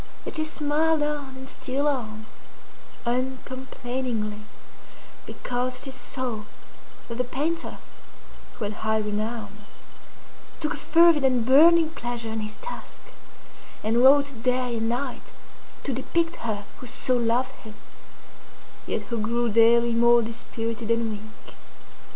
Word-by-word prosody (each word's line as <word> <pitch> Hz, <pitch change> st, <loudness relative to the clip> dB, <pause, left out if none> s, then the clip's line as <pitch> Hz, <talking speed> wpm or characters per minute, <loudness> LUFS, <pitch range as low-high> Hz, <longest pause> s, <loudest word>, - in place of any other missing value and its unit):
Yet -, -, -5 dB
she 310 Hz, -, 0 dB
smiled 310 Hz, +1 st, +1 dB
on 290 Hz, -3 st, -3 dB
and 265 Hz, 0 st, -9 dB
still 275 Hz, +2 st, -2 dB
on, 220 Hz, -6 st, -2 dB, 0.8 s
uncomplainingly, 250 Hz, -3 st, -3 dB, 0.8 s
because 250 Hz, +1 st, -3 dB
she 270 Hz, -, -6 dB
saw 255 Hz, -4 st, -4 dB, 0.6 s
that 235 Hz, 0 st, -6 dB
the -, -, +3 dB
painter 300 Hz, +7 st, -2 dB, 0.8 s
(who -, -, -5 dB
had 205 Hz, +1 st, -2 dB
high 220 Hz, 0 st, +2 dB
renown) 215 Hz, +2 st, -3 dB, 1.0 s
took 305 Hz, -, -1 dB
a -, -, -6 dB
fervid 335 Hz, -3 st, +5 dB
and 250 Hz, -3 st, +3 dB
burning 320 Hz, +5 st, +7 dB
pleasure 240 Hz, -5 st, -4 dB
in 220 Hz, -, -2 dB
his 215 Hz, 0 st, -5 dB
task, -, -, -8 dB, 0.8 s
and 225 Hz, +3 st, +2 dB
wrought 280 Hz, -2 st, +5 dB
day 250 Hz, -1 st, +1 dB
and 225 Hz, 0 st, 0 dB
night 250 Hz, +2 st, -4 dB, 0.5 s
to 275 Hz, -, -1 dB
depict 330 Hz, +6 st, 0 dB
her 210 Hz, -3 st, -3 dB
who 250 Hz, -, -8 dB
so 255 Hz, +1 st, +1 dB
loved 240 Hz, +2 st, +1 dB
him, 215 Hz, -1 st, -12 dB, 1.1 s
yet -, -, -1 dB
who 235 Hz, -2 st, -3 dB
grew 235 Hz, +2 st, +1 dB
daily 230 Hz, +2 st, +5 dB
more 235 Hz, 0 st, +5 dB
dispirited 230 Hz, 0 st, -4 dB
and 230 Hz, -1 st, +1 dB
weak. 215 Hz, +1 st, -10 dB
245 Hz, 125 wpm, -26 LUFS, 225-270 Hz, 1.1 s, burning